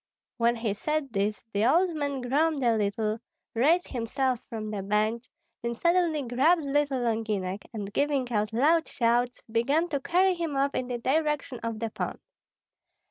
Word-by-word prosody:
When 235 0 +3
he 225 -1 -2
had 200 - -2
said 300 -3 -2
this, 205 +1 -1
the 205 +1 +1
old 340 +6 +3
man 285 -3 -2
groaned 285 +3 +1
a 235 -2 +4
little, 215 +1 -1 0.3
raised 315 +10 +3
himself 255 +1 -1
from 215 -2 -5
the 205 -2 -3
bench, 215 +5 0 0.3
then 235 0 -2
suddenly 340 0 +2
grabbed 285 +8 +3
little 280 -2 +1
Longinek, 215 -5 -1
and 205 -3 -6
giving 280 -4 0
out 210 -1 0
loud 310 +8 +3
shouts, 245 -1 0
began 275 +10 +1
to 285 -3 -1
carry 370 +6 +3
him 330 -5 -3
off 275 +1 +1
in 255 - -2
the 245 -1 -2
direction 280 0 0
of 230 -1 -4
the 225 0 -3
pond. - - -4
250 Hz, 170 wpm, -28 LUFS, 225-295 Hz, 0.3 s, a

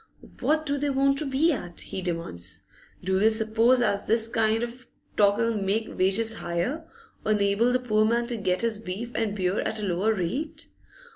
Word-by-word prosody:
What 310 0 +1
do 285 -1 -1
they 290 +1 0
want 275 0 +2
to 305 - -3
be 280 +5 +2
at? 175 -9 -5
he 190 - -4
demands. 165 - -4 0.4
Do 190 +1 +1
they 215 +2 +5
suppose 225 +3 +3
as 200 -3 0
this 225 0 +4
kind 225 0 +1
of 240 +1 -7 0.3
talk 200 -1 +4
'll 230 0 +1
make 210 +2 -2
wages 205 +5 +1
higher, 225 - -3 0.3
or 215 - +2
enable 205 +3 +2
the 250 0 +1
poor 215 -3 +2
man 235 +2 +1
to 235 -1 -3
get 185 -3 0
his 230 -2 0
beef 220 +4 -6
and 215 -3 -1
beer 185 0 0
at 220 - -2
a 210 - -3
lower 195 +4 +1
rate? 205 - -3
220 Hz, 195 wpm, -26 LUFS, 195-240 Hz, 0.4 s, they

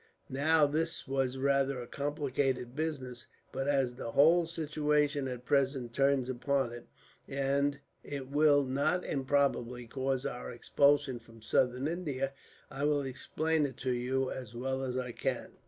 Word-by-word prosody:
Now 150 +3 +4
this 160 +2 -1
was 135 -1 0
rather 140 0 +2
a 120 - -5
complicated 135 -3 -2
business; 135 -6 -4 0.2
but 135 +1 -3
as 135 -3 +2
the 115 -2 -6
whole 165 +4 +5
situation 150 -3 0
at 125 -1 -6
present 135 -4 +1
turns 135 -1 +2
upon 130 0 0
it; 120 - -10 0.4
and 140 +1 0 0.2
it 140 -2 -5
will, 145 -1 +5
not 140 +7 0
improbably, 130 -3 0
cause 130 +2 -2
our 125 - -4
expulsion 140 +1 +2
from 115 -1 -17
Southern 125 +4 +1
India; 145 -6 -2 0.4
I 140 0 -4
will 145 -1 +2
explain 155 +4 -1
it 130 - -10
to 130 - +2
you 130 +2 0
as 120 -3 -7
well 130 +2 -2
as 130 -1 -2
I 125 -1 -2
can. - - -3
135 Hz, 150 wpm, -32 LUFS, 130-145 Hz, 0.4 s, whole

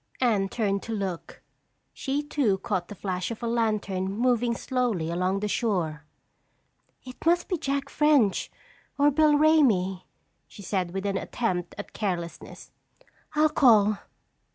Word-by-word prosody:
Anne 210 -6 +2
turned 200 -3 -1
to 225 - -5
look. 190 -5 -5 0.5
She 280 +2 -2
too 275 -9 +1
caught 190 -3 -2
the 205 - -9
flash 185 -2 -3
of 230 0 -7
a - - -1
lantern 210 -5 -1
moving 240 +2 +1
slowly 230 -12 -1
along 185 +3 0
the 210 - -1
shore. 175 -10 -1 1.0
"It 255 -1 -11
must 345 +1 +2
be 365 - 0
Jack 280 -3 -2
French 290 -10 +2 0.5
or 290 +1 +4
Bill 305 +1 +4
Ramey," 220 - +3 0.4
she 200 - -12
said 185 -2 -1
with 190 +2 -5
an 200 -1 0
attempt 185 -6 -3
at 205 - -8
carelessness. 175 -5 -5 0.6
"I'll 305 +1 +4
call." 215 -8 +4
215 Hz, 140 wpm, -26 LUFS, 190-255 Hz, 1.0 s, or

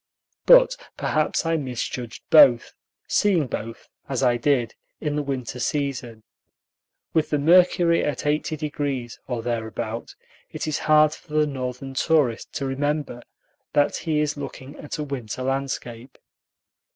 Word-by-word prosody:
But - - +7 0.2
perhaps 155 +2 0
I 165 0 +1
misjudged 125 -3 -5
both, 135 -7 +6 0.3
seeing 185 -7 +2
both, 115 -2 -6 0.2
as 135 -1 -1
I 125 -1 +4
did, 120 -1 +1 0.3
in 150 -1 -2
the 150 - 0
winter 130 -4 -4
season. 125 -6 -3 0.9
With 160 -1 +1
the 150 - +1
mercury 170 +2 +4
at 145 -4 -2
80°, 145 -4 -2
or 120 -3 -3
thereabout, 115 -1 -4 0.3
it - - -5
is 155 -2 -1
hard 155 0 +6
for 155 -1 -13
the 155 0 +4
Northern 135 -1 -5
tourist 135 -4 +1
to 140 - -3
remember 145 -1 -2 0.5
that 145 -1 +2
he 155 -2 0
is 150 -1 -1
looking 140 -1 -8
at 150 - -6
a 150 - -3
winter 130 -4 -5
landscape. 130 -2 -4
140 Hz, 135 wpm, -24 LUFS, 125-150 Hz, 0.9 s, But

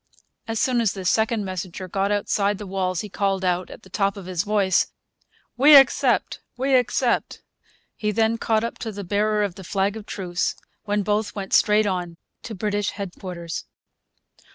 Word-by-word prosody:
As 225 -1 -2
soon 250 -2 +2
as 220 -4 +1
this 190 -2 0
second 220 -1 +1
messenger 185 0 -5
got 195 +2 -1
outside 205 0 +1
the 210 - -7
walls 185 -2 -1
he 210 - -6
called 195 -1 -1
out, 180 0 0
at - - -12
the - - -16
top 200 -1 0
of 195 - -8
his 180 -2 -1
voice, 200 -3 +2 0.7
'We 290 +4 +8
accept! 270 -2 +4 0.2
We 265 +2 0
accept!' 245 0 +1 0.5
He 210 - -2
then 225 +1 +1
caught 220 -1 +1
up 230 - -4
to 225 - -4
the 200 -1 -6
bearer 210 +3 +1
of 200 -3 -2
the 190 +1 -11
flag 195 +3 0
of 215 -2 -9
truce, 180 -2 -2 0.3
when 205 -1 0
both 210 +1 -1
went 195 -2 -5
straight 210 0 +4
on 180 -4 -2 0.2
to 225 - -7
British 205 +1 -1
headquarters. 180 -4 -6
205 Hz, 175 wpm, -23 LUFS, 190-220 Hz, 0.7 s, We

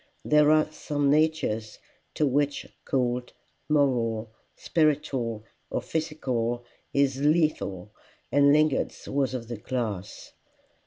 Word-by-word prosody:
There 150 0 +5
are 155 0 +4
some 145 -2 0
natures 150 -9 +1 0.4
to 150 - +2
which 145 +1 0 0.2
cold, 125 -2 -1 0.4
moral, 120 -7 +1 0.2
spiritual, 140 -8 0 0.3
or - - -1
physical, 125 -7 -2 0.3
is 140 -1 +1
lethal, 145 - +1 0.4
and 140 0 +5
Lingard's 150 -1 +1
was 135 -2 0
of 115 -2 -5
the 120 -1 -5
class. 105 -5 -4
135 Hz, 105 wpm, -27 LUFS, 115-150 Hz, 0.4 s, There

